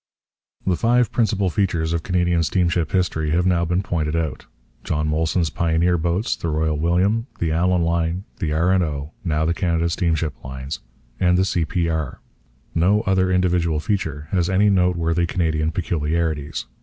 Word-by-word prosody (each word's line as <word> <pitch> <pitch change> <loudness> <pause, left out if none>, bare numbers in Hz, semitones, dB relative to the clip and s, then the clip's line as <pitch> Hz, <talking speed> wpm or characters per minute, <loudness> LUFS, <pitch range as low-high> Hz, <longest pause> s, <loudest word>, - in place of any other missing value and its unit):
The 95 - +2
five 120 +2 +2
principal 105 -5 +1
features 85 -4 0
of 85 - 0
Canadian 90 -1 +1
steamship 85 -1 +1
history 90 -4 0
have 85 +3 +1
now 85 -2 +2
been 90 +3 0
pointed 80 -5 -1
out: 80 -5 -3 0.4
John 75 0 -1
Molson's 80 +2 0
pioneer 85 +1 +1
boats, 85 +6 0
the - - -5
Royal 80 0 0
William, 90 - +1
the 80 -2 -1
Allan 90 +2 +2
line, 85 +2 0 0.2
the 80 -6 -1
'R. 85 +4 +2
and 95 -1 +3
O.' 75 -1 -4
(now 80 -3 0
the 85 - +1
Canada 85 -2 0
Steamship 80 -3 -1
Lines), 65 +2 -6 0.4
and 90 0 +3
the 95 - +3
'C.P.R.' 80 -4 -1 0.5
No 95 +6 +3
other 95 -3 +1
individual 90 -3 +1
feature 75 -5 -2
has 90 -2 +1
any 100 +2 +3
noteworthy 85 -2 +1
Canadian 80 -3 0
peculiarities. 80 -3 -2
85 Hz, 155 wpm, -22 LUFS, 80-90 Hz, 0.5 s, and